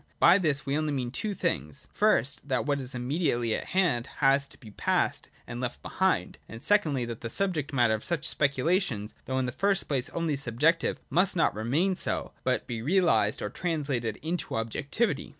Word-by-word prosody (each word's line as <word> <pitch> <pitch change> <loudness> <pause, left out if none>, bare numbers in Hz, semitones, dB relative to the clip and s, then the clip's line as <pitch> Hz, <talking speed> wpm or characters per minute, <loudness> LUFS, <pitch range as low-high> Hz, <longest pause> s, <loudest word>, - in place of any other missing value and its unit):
By 180 +4 +7
this 150 -6 +1
we 140 0 -1
only 155 0 0
mean 125 -3 -2
two 205 - -2
things: 75 - -2
first, 140 +4 +1
that 130 -2 0
what 145 -1 0
is 130 -1 -2
immediately 125 -3 0
at - - -3
hand 165 -11 +1
has 140 0 +3
to - - -14
be 110 -4 -13
passed - - 0 0.2
and 120 +1 -6
left 120 - -4
behind; - - 0
and 115 +2 -9
secondly, 155 -12 +2
that 115 -1 -7
the 115 - -4
subject 165 - -1
matter 120 -5 +3
of 110 - -3
such 165 -3 -1
speculations, 140 - +1
though 130 - -2
in 130 - +1
the 125 - -2
first 195 +7 0
place 135 -4 0
only 165 -3 -1
subjective, 140 +5 +2
must 185 +6 +3
not 165 - +2
remain 140 - +1
so, - - 0
but 130 -1 0
be 115 -2 -4
realised 135 - +2
or 105 - -3
translated 140 - -2
into 170 +3 -2
objectivity. 140 - -1
140 Hz, 185 wpm, -28 LUFS, 120-165 Hz, 0.2 s, By